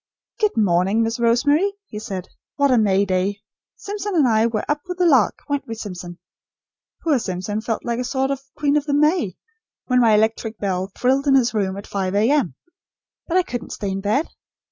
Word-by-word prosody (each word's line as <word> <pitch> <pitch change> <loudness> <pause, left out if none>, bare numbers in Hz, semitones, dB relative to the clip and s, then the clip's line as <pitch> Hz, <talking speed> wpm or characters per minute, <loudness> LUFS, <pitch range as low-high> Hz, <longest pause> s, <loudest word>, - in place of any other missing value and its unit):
"Good 425 -2 +2
day, 190 -1 +2
Miss 225 +1 +1
Rosemary," 285 +11 +3
he 210 - -7
said. 190 -4 -5 0.3
"What 280 -1 +3
a 250 - +5
May 200 -2 +3
Day! 195 +1 -1 0.3
Simpson 410 -1 -4
and 295 -6 +4
I 220 0 +3
were 220 -2 -2
up 295 0 0
with 360 -1 -4
the 360 - +2
lark; 265 - +4
weren't 285 -1 -2
we, 225 - -4
Simpson? 180 -5 -7 0.9
Poor 300 -6 +2
Simpson 195 +1 -3
felt 225 0 -3
like 235 0 -1
a - - -1
sort 265 +2 -1
of 275 -1 -3
'Queen 290 -1 +1
of 300 0 -2
the 285 - +1
May,' 300 - +2 0.5
when 250 -1 +2
my 225 -3 +5
electric 220 +1 0
bell 190 -1 -2
trilled 270 +3 +1
in 270 - +5
his 245 -4 +3
room, 195 -3 -1
at 200 - -7
5 195 -1 -2
A.M. 220 - +2 0.7
But 355 - +1
I 370 - +4
couldn't 245 -7 -6
stay 200 -2 -3
in 195 +1 -3
bed. 215 +10 +1
230 Hz, 200 wpm, -21 LUFS, 200-285 Hz, 0.9 s, a